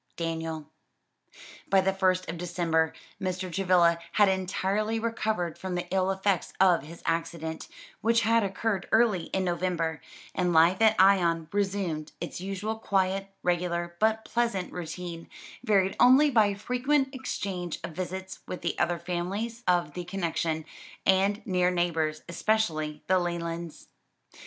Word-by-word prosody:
DANIEL. 160 Hz, -2 st, -3 dB, 1.0 s
By 195 Hz, -, +5 dB
the 190 Hz, 0 st, +2 dB
first 185 Hz, -1 st, +1 dB
of 165 Hz, 0 st, -5 dB
December 170 Hz, -2 st, 0 dB, 0.3 s
Mr. 185 Hz, -1 st, -3 dB
Travilla 175 Hz, -3 st, +3 dB
had 205 Hz, -2 st, +5 dB
entirely 190 Hz, +3 st, 0 dB
recovered 220 Hz, -7 st, -2 dB
from 185 Hz, -1 st, -4 dB
the 175 Hz, -, -2 dB
ill 190 Hz, 0 st, +2 dB
effects 190 Hz, -1 st, 0 dB
of 180 Hz, -3 st, +5 dB
his 165 Hz, +4 st, -12 dB
accident 165 Hz, -1 st, -2 dB, 0.3 s
which 230 Hz, +1 st, +3 dB
had 230 Hz, +1 st, +3 dB
occurred 200 Hz, 0 st, -2 dB
early 220 Hz, -7 st, +3 dB
in 190 Hz, -, -1 dB
November 170 Hz, -4 st, -1 dB, 0.3 s
and 180 Hz, -2 st, 0 dB
life 170 Hz, +5 st, +5 dB
at 220 Hz, -1 st, +6 dB
Ion 175 Hz, -4 st, +4 dB
resumed 190 Hz, -6 st, -2 dB
its 175 Hz, +1 st, -5 dB
usual 195 Hz, +3 st, -3 dB
quiet, 195 Hz, -2 st, 0 dB, 0.2 s
regular, 175 Hz, -1 st, -1 dB
but 220 Hz, 0 st, +2 dB
pleasant 230 Hz, -6 st, -1 dB
routine, 175 Hz, -1 st, -6 dB, 0.3 s
varied 195 Hz, -5 st, +2 dB
only 275 Hz, +4 st, +6 dB
by 210 Hz, -4 st, +4 dB
frequent 265 Hz, +6 st, 0 dB
exchange 190 Hz, -, -4 dB
of 170 Hz, -, -5 dB
visits 185 Hz, +2 st, -5 dB
with 180 Hz, -, -6 dB
the 170 Hz, -, -2 dB
other 175 Hz, 0 st, +1 dB
families 185 Hz, +7 st, -3 dB
of 175 Hz, -5 st, +2 dB
the 180 Hz, -, -5 dB
connection, 170 Hz, -3 st, -2 dB, 0.4 s
and 195 Hz, +2 st, +2 dB
near 180 Hz, -3 st, +2 dB
neighbors, 165 Hz, -3 st, 0 dB
especially 165 Hz, -5 st, -1 dB
the 185 Hz, 0 st, +3 dB
Lelands. 170 Hz, -1 st, -4 dB
185 Hz, 135 wpm, -28 LUFS, 170-200 Hz, 1.0 s, at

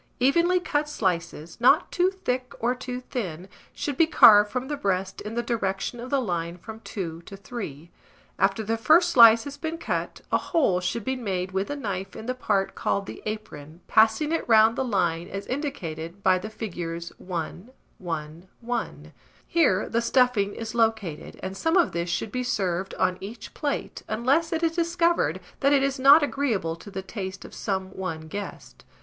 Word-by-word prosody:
Evenly 340 Hz, +8 st, +3 dB
cut 300 Hz, -4 st, -1 dB
slices, 170 Hz, -, -3 dB
not 275 Hz, +7 st, +5 dB
too 360 Hz, +1 st, +3 dB
thick 255 Hz, -10 st, -3 dB
or 240 Hz, +2 st, +1 dB
too 250 Hz, 0 st, -6 dB
thin, 185 Hz, -9 st, -5 dB, 0.2 s
should 285 Hz, -3 st, -4 dB
be 330 Hz, -, +5 dB
carved 210 Hz, -8 st, +7 dB
from 255 Hz, +2 st, -3 dB
the 295 Hz, -, -2 dB
breast 190 Hz, -7 st, -2 dB
in 215 Hz, +2 st, -6 dB
the 240 Hz, -, 0 dB
direction 220 Hz, -1 st, -2 dB
of 245 Hz, +2 st, -7 dB
the 280 Hz, -, +2 dB
line 175 Hz, -6 st, -2 dB
from 220 Hz, +5 st, -10 dB
2 170 Hz, -7 st, -6 dB
to 195 Hz, -, -9 dB
3; 175 Hz, -, -7 dB, 0.5 s
after 195 Hz, +2 st, +2 dB
the 225 Hz, +2 st, -1 dB
first 315 Hz, +9 st, +5 dB
slice 230 Hz, -2 st, +8 dB
has 285 Hz, 0 st, -7 dB
been 320 Hz, +2 st, -4 dB
cut, -, -, -3 dB
a -, -, +3 dB
hole 210 Hz, -, +1 dB
should 190 Hz, +5 st, -3 dB
be 265 Hz, -, 0 dB
made 190 Hz, -7 st, -3 dB
with 190 Hz, +1 st, -1 dB
the 290 Hz, -, -3 dB
knife 195 Hz, -7 st, -4 dB
in 220 Hz, -, -8 dB
the 255 Hz, -, -1 dB
part 205 Hz, -6 st, 0 dB
called 200 Hz, -, -1 dB
the -, -, -9 dB
apron, 170 Hz, -7 st, -7 dB
passing 220 Hz, +8 st, +4 dB
it 330 Hz, -, 0 dB
round 220 Hz, 0 st, +6 dB
the -, -, 0 dB
line, 175 Hz, -7 st, 0 dB
as 195 Hz, +1 st, -6 dB
indicated 185 Hz, -, -5 dB
by 185 Hz, -1 st, +4 dB
the 215 Hz, -, -6 dB
figures 170 Hz, -6 st, -5 dB
1, 180 Hz, +4 st, -5 dB, 0.3 s
1, 165 Hz, 0 st, -6 dB
1: 240 Hz, 0 st, -4 dB, 0.3 s
here 265 Hz, -, +2 dB
the 230 Hz, -, 0 dB
stuffing 235 Hz, -4 st, +2 dB
is 225 Hz, -1 st, -6 dB
located, 220 Hz, -9 st, -1 dB
and 190 Hz, 0 st, -4 dB
some 325 Hz, -, +1 dB
of 345 Hz, -, +3 dB
this 170 Hz, 0 st, -2 dB
should 205 Hz, +4 st, -2 dB
be 250 Hz, -, -2 dB
served 190 Hz, -6 st, -1 dB
on 185 Hz, 0 st, 0 dB
each 210 Hz, +3 st, -8 dB
plate, 290 Hz, -2 st, -3 dB
unless 265 Hz, +9 st, +1 dB
it 325 Hz, 0 st, -1 dB
is 330 Hz, -, +3 dB
discovered 335 Hz, -, +1 dB, 0.2 s
that 280 Hz, -, +3 dB
it 275 Hz, -1 st, +4 dB
is 275 Hz, 0 st, -1 dB
not 280 Hz, +4 st, +8 dB
agreeable 230 Hz, -, -1 dB
to 185 Hz, -, -12 dB
the 190 Hz, -1 st, -6 dB
taste 190 Hz, -1 st, -6 dB
of -, -, -12 dB
some 190 Hz, -2 st, -3 dB
one 175 Hz, -4 st, -4 dB
guest. 200 Hz, +6 st, -8 dB
220 Hz, 185 wpm, -26 LUFS, 185-260 Hz, 0.5 s, slice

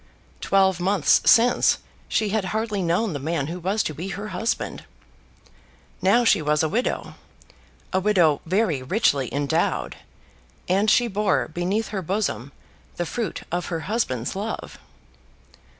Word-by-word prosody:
Twelve 190 Hz, -2 st, +2 dB
months 185 Hz, -2 st, +3 dB
since 240 Hz, +2 st, +5 dB, 0.3 s
she 215 Hz, -, 0 dB
had 210 Hz, -1 st, 0 dB
hardly 215 Hz, +1 st, -2 dB
known 180 Hz, +3 st, 0 dB
the 145 Hz, -, -3 dB
man 150 Hz, 0 st, -2 dB
who 170 Hz, +4 st, -5 dB
was 195 Hz, +5 st, 0 dB
to 155 Hz, -, -3 dB
be 165 Hz, +6 st, -6 dB
her 205 Hz, +2 st, -5 dB
husband. 210 Hz, +5 st, -3 dB, 1.2 s
Now 205 Hz, +6 st, +4 dB
she 195 Hz, -, +4 dB
was 150 Hz, +1 st, +1 dB
a -, -, +2 dB
widow, 235 Hz, +8 st, -2 dB, 0.8 s
a 190 Hz, -, +3 dB
widow 180 Hz, -7 st, +3 dB
very 180 Hz, -6 st, +1 dB
richly 140 Hz, -, +1 dB
endowed, 140 Hz, -1 st, -1 dB, 0.7 s
and 195 Hz, +4 st, +2 dB
she 240 Hz, +2 st, +4 dB
bore 210 Hz, -1 st, 0 dB
beneath 185 Hz, +7 st, -2 dB
her 200 Hz, -2 st, -3 dB
bosom 170 Hz, -, -2 dB, 0.4 s
the 175 Hz, -, -2 dB
fruit 220 Hz, +2 st, -4 dB
of 175 Hz, +1 st, -2 dB
her 165 Hz, -2 st, -3 dB
husband's 160 Hz, -, -2 dB
love. 210 Hz, +3 st, -5 dB
190 Hz, 140 wpm, -24 LUFS, 160-215 Hz, 1.2 s, since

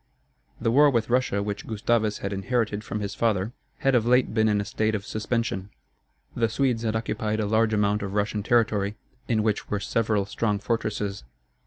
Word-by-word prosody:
The 115 Hz, -, +1 dB
war 145 Hz, +4 st, +6 dB
with 120 Hz, -3 st, 0 dB
Russia, 120 Hz, -5 st, +1 dB
which 105 Hz, 0 st, -4 dB
Gustavus 110 Hz, -1 st, +1 dB
had 100 Hz, -, -2 dB
inherited 105 Hz, +1 st, -1 dB
from 105 Hz, 0 st, -4 dB
his 100 Hz, 0 st, -3 dB
father, 110 Hz, -1 st, 0 dB, 0.2 s
had 135 Hz, -, +1 dB
of 120 Hz, -3 st, +4 dB
late 125 Hz, +1 st, +3 dB
been 110 Hz, -1 st, +3 dB
in 105 Hz, -1 st, +2 dB
a 100 Hz, -, -2 dB
state 110 Hz, +1 st, 0 dB
of 100 Hz, -1 st, -4 dB
suspension. 110 Hz, -3 st, -2 dB, 0.7 s
The 115 Hz, -1 st, +1 dB
Swedes 125 Hz, 0 st, +1 dB
had 110 Hz, -1 st, -1 dB
occupied 110 Hz, -1 st, -1 dB
a 105 Hz, -, 0 dB
large 110 Hz, +1 st, +2 dB
amount 105 Hz, -1 st, +1 dB
of 100 Hz, 0 st, -4 dB
Russian 105 Hz, 0 st, 0 dB
territory, 105 Hz, -2 st, +1 dB, 0.3 s
in 110 Hz, -3 st, +1 dB
which 105 Hz, -1 st, -1 dB
were 105 Hz, -, 0 dB
several 105 Hz, -1 st, 0 dB
strong 105 Hz, 0 st, -1 dB
fortresses. 105 Hz, -2 st, -2 dB
110 Hz, 185 wpm, -26 LUFS, 105-115 Hz, 0.7 s, war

